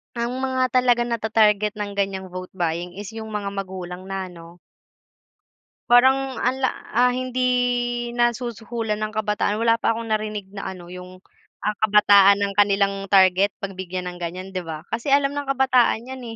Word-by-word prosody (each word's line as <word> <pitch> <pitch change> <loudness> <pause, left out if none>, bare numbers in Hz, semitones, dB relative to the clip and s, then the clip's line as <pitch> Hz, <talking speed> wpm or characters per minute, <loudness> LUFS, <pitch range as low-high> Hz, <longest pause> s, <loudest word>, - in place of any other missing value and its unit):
ang 240 +2 -3
mga 260 -1 0
talagang 245 -1 +3
natatarget 215 -2 +2
ng 205 -1 -4
ganiyang 195 -1 -2
vote 185 0 -8
buying 175 -1 -2
is 210 +2 -8
'yong 220 -1 -7
mga 210 -1 -3
magulang 185 -2 -6
na 190 -1 -5
ano 170 0 -13 1.3
parang 265 +2 +4
anla 260 0 +1 0.2
ah, 250 +2 +4
hindi 255 0 -3 0.7
nasusuhulan 235 -2 -2
ang 215 0 -3
kabataan. 210 -1 0
Wala 230 0 +3
pa 230 - +2
akong 225 0 -6
narinig 215 -2 -2
na, 195 - -5
ano, 175 -1 -12
'yong 180 0 -10 0.4
ang 210 0 -1
kabataan 205 -1 +5
ang 200 0 0
kanilang 200 -1 +2
target 190 0 +4
'pag 195 -1 -6
bigyan 185 -1 -4
ng 175 - -10
ganiyan, 180 +3 -5
'di 185 -1 -4
ba. 155 -1 -6
Kasi 235 +5 -1
alam 280 0 +3
ng 285 -1 -4
kabataan 255 -2 +2
'yan, 265 0 -7
210 Hz, 160 wpm, -22 LUFS, 190-240 Hz, 1.3 s, kabataan